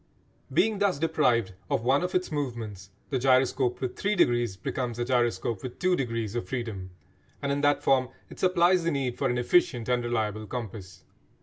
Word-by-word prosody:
Being 220 -2 +2
thus 200 -6 +2
deprived 135 -10 +1 0.2
of - - 0
one 135 +4 +3
of 180 +1 -3
its 185 -1 0
movements 115 -9 -4 0.2
the 130 - +1
gyroscope 130 -1 +2
with 130 -2 -3
three 205 +1 0
degrees 120 - +2
becomes 120 +4 -3
a 120 - -1
gyroscope 120 -4 0
with 125 -1 -7
two 185 0 +2
degrees 115 - -2
of 120 - -4
freedom, 110 -8 -4 0.5
and 140 - -2
in 140 0 0
that 145 0 +2
form 130 -2 +3 0.2
it - - -13
supplies 180 -1 +3
the 170 - +1
need 135 -5 -1
for 135 - +1
an 120 - 0
efficient 125 -2 +2
and 125 -1 +1
reliable 110 -3 -2
compass. 105 -7 -7
125 Hz, 185 wpm, -27 LUFS, 115-145 Hz, 0.5 s, one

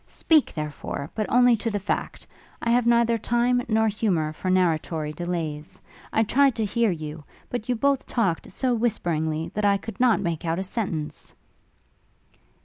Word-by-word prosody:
Speak, 315 -4 +2
therefore! 150 -1 -5
but 215 -2 -2
only 245 0 +6
to 230 +2 -2
the 205 - -1
fact. 200 - -3 0.3
I 235 - 0
have 240 0 +3
neither 235 -1 +3
time 240 +3 +2
nor 220 0 +2
humour 185 -8 0
for 185 - -4
narratory 160 -4 +1
delays. 160 -3 -4 0.3
I 220 - +3
tried 270 +3 +3
to 225 - 0
hear 230 +2 +1
you; 155 -3 -5 0.3
but 245 -1 -4
you 250 - +2
both 275 +3 +1
talked 195 -9 -1
so 255 +5 0
whisperingly, 165 -9 -1
that 210 - -2
I 200 -1 +4
could 220 +3 -9
not 245 -3 +4
make 170 -4 -2
out 165 0 -1
a 190 - -2
sentence.' 170 -7 -4
205 Hz, 165 wpm, -25 LUFS, 165-235 Hz, 0.3 s, only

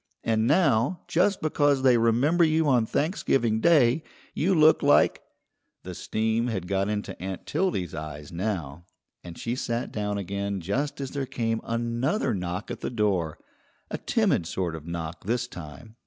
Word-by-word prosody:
And 110 0 +1
now, 140 0 +2
just 185 +4 +2
because 145 -3 +2
they 130 -2 +6
remember 120 +9 +3
you 160 -1 +3
on 120 -5 +3
Thanksgiving 135 - +1
Day, 150 -2 +4 0.3
you 185 +4 +1
look 155 0 +5
like 145 0 +4 0.3
" - - -52
The 90 - -7
steam 110 +5 -1
had 95 -7 -3
got 100 +1 0
into 105 -3 -4
Aunt 95 0 -5
Tildy's 175 - -1
eyes 75 -1 -7
now, 85 -4 -4 0.4
and 85 -1 -9
she 120 +1 -3
sat 120 -1 -3
down 105 -1 -2
again 100 0 -3
just 130 - -2
as 135 -1 -4
there 140 -2 -3
came 115 -3 -2
another 120 - -1
knock 90 0 -4
at - - -5
the - - -3
door, 100 -9 0 0.5
a - - -3
timid 85 - +1
sort 90 -2 -2
of 80 0 -9
knock 85 0 -5
this 120 +3 0
time. 90 +4 -10
115 Hz, 165 wpm, -26 LUFS, 95-135 Hz, 0.5 s, they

